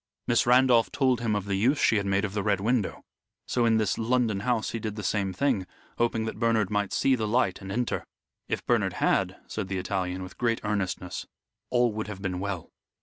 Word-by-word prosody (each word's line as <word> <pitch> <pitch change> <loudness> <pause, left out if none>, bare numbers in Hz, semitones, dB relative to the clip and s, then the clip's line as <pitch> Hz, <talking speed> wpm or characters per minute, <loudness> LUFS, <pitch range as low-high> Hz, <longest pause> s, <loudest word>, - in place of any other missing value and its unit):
Miss 120 - +2
Randolph 125 -2 +5
told 130 -4 +2
him 110 -3 0
of 100 -1 -2
the 100 - -2
use 120 +9 +3
she 115 - +3
had 100 -1 -1
made 100 +1 +2
of 100 - -5
the 105 - -1
Red 100 -1 +1
Window, 115 +1 0 0.4
so 120 -2 +2
in 110 -1 +4
this 110 -3 0
London 115 -3 +1
house 115 +1 0
he 115 - -3
did 110 -1 -4
the 105 - -6
same 100 0 0
thing, 100 -2 0 0.3
hoping 115 -1 +1
that 110 - -5
Bernard 115 -4 +2
might 105 -1 0
see 135 - +2
the 110 -4 0
light 105 -4 +1
and 95 0 -7
enter. 120 +4 -1 0.4
If - - -3
Bernard - - +2
had," - - +1
said 110 -3 -4
the 95 0 -2
Italian, 95 0 -2
with 90 - -11
great 115 -2 +1
earnestness, 95 -3 -2 0.4
"all 120 -1 +3
would 110 0 -4
have 105 -2 -6
been 90 -2 -2
well." 100 -3 -4
105 Hz, 215 wpm, -27 LUFS, 100-120 Hz, 0.4 s, Randolph